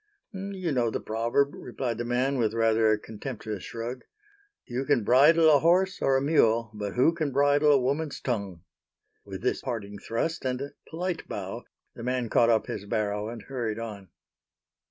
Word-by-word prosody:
"You 190 -3 -4
know 120 -4 +1
the - - -3
proverb," 120 +6 0
replied 120 -4 -4
the 120 - -2
man, 130 +3 0
with 110 -1 +1
rather 115 -1 +3
a 110 - +3
contemptuous 110 -2 -6
shrug, 120 +5 -6 0.6
"You 125 +1 -3
can 135 -5 +2
bridle 150 +8 +6
a - - +5
horse 185 +5 +2
or 135 -1 +3
a - - 0
mule, 115 -7 +3
but 105 -2 -4
who 130 +7 +4
can 155 -4 -2
bridle 145 +2 +4
a 145 - +6
woman's 140 +4 -1
tongue." 100 -8 -3 0.6
With 95 +1 -8
this 125 - 0
parting 105 -5 -5
thrust 140 +11 -2
and 125 -1 -1
a 140 +1 -5 0.2
polite 175 +1 -3
bow, - - -5 0.3
the - - -10
man 125 -1 -1
caught 115 +1 +4
up 115 -2 +3
his 100 - -5
barrow 105 0 -1
and 115 -2 -8
hurried 120 -5 -3
on. 105 -5 -7
120 Hz, 175 wpm, -27 LUFS, 110-140 Hz, 0.6 s, bridle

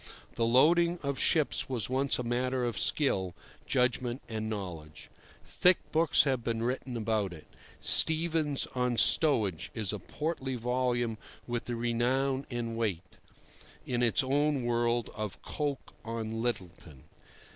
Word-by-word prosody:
The 115 - 0
loading 170 +8 +4
of 140 -1 -2
ships 155 -5 +2
was 120 -6 0
once 135 +2 +1
a 125 - -3
matter 125 +2 -1
of 115 -5 -2
skill, 95 - +1 0.3
judgment, 125 0 0
and 110 -1 -4
knowledge. 85 -8 -7 0.3
Thick 180 0 +4
books 160 +1 +4
have 130 -4 0
been 115 -1 -2
written 125 0 -2
about 110 -4 -1
it. 80 - -12 0.3
"Stevens 160 -3 +3
on 125 -1 0
Stowage" 110 - +2
is 105 -3 -2
a 105 - -4
portly 135 - -3
volume 120 -2 -1 0.3
with 120 -1 -3
the 120 - -3
renown 130 +4 0
and 120 -2 -3
weight 95 -6 -3 0.7
(in 120 -1 -1
its 120 +4 +3
own 140 0 +1
world) 120 -1 0
of 105 -2 -5
Coke 145 -2 -4
on 115 -1 -4
Littleton. 90 - -5
120 Hz, 135 wpm, -30 LUFS, 110-135 Hz, 0.7 s, loading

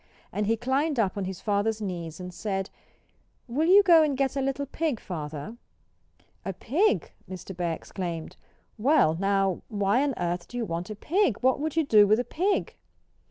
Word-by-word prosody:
And 210 -1 -1
he 225 +1 +2
climbed 270 +5 0
up 195 -4 +1
on 200 -2 -2
his 190 -1 -6
father's 210 +1 0
knees 175 -5 -5
and 180 0 -7
said 195 -1 -3 0.8
"Will 290 +7 0
you 400 +3 +7
go 340 -4 +7
and 295 -4 +1
get 270 -1 0
a 275 - 0
little 275 +1 -1
pig, 290 -3 -2
Father?" 155 +4 -6 0.9
"A 195 - -3
pig?" 340 - +1 0.2
Mr. 185 0 -8
Bear 170 -2 -1
exclaimed. 170 -2 -6 0.4
"Well, 255 - +4
now 195 -2 +1
why 205 +2 +1
on 280 -3 0
earth 175 0 -2
do 245 - -7
you 235 - -1
want 170 0 -4
a 215 - -5
pig? 305 - +1
What 260 +1 +3
would 310 +1 -2
you 325 -2 +2
do 210 -5 +6
with 215 +3 +4
a - - +1
pig?" 380 +9 -1
215 Hz, 185 wpm, -27 LUFS, 185-280 Hz, 0.9 s, you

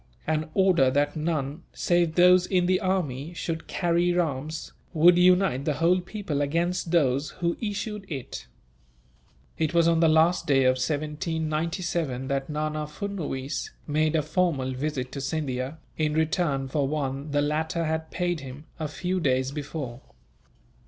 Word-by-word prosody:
An 155 0 -1
order 185 -9 +4
that 145 +2 +1
none, 155 -1 -2
save 175 -2 +1
those 180 0 +6
in 180 -2 +2
the 185 +1 +2
army, 170 - -2
should 165 -1 -4
carry 175 0 +1
arms 155 -2 -2 0.2
would 170 +2 +6
unite 180 -6 +4
the 150 - 0
whole 175 +4 +3
people 180 -6 -3
against 170 +5 0
those 140 -4 +2
who 170 -1 0
issued 210 -2 -4
it." 135 - -6 1.1
It 160 +1 0
was 170 -1 +5
on 165 -1 +3
the 165 -1 +5
last 165 +2 +3
day 135 -2 +4
of 130 0 +3
1797 155 0 -2
that 135 +1 -1
Nana 150 0 -2
Furnuwees 150 -5 -4 0.2
made 155 +1 +1
a 155 - +2
formal 155 -4 0
visit 130 -1 -3
to 140 - -5
Scindia, 135 -1 -3 0.2
in 155 -1 +1
return 155 -4 0
for 140 +1 0
one 140 0 -3
the 145 0 +1
latter 160 +3 -1
had 160 0 -2
paid 175 -2 -1
him, 135 +2 -9
a 155 - -2
few 180 +5 -2
days 130 -4 +1
before. 140 -4 -5
155 Hz, 150 wpm, -26 LUFS, 140-175 Hz, 1.1 s, those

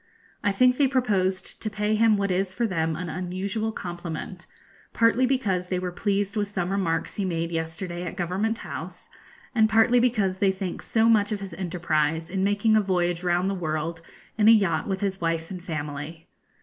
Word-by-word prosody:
I 205 - +3
think 250 +5 +4
they 280 - +4
proposed 195 -8 0
to 215 - -2
pay 210 0 -1
him 215 -1 +4
what 200 -1 0
is 190 +1 -1
for 240 - +1
them 165 -6 0
an 180 +3 -4
unusual 190 +5 -3
compliment, 175 -1 -6 0.5
partly 230 +3 +3
because 200 -9 0
they 185 - -1
were 180 0 -3
pleased 200 +2 -1
with 205 -1 0
some 185 -2 -2
remarks 175 -5 -1
he 205 - 0
made 170 -2 -2
yesterday 165 +2 -4
at 180 - -5
Government 195 +6 -1
House, - - -8 0.4
and 220 -3 +4
partly 225 +2 +5
because 210 -6 +1
they 195 -1 +4
think 190 -2 -5
so 225 0 +2
much 215 -2 +4
of 210 - -1
his 195 -3 -7
enterprise 165 -2 -1
in 190 0 0
making 205 +2 +3
a 215 - +5
voyage 175 -3 0
round 175 +1 +1
the 195 - 0
world 165 -2 -3 0.4
in 210 - +5
a - - +10
yacht 200 -6 +3
with 190 -1 -2
his 195 -2 -2
wife 165 0 -1
and 180 -2 -7
family. 150 0 -5
190 Hz, 190 wpm, -25 LUFS, 175-210 Hz, 0.5 s, a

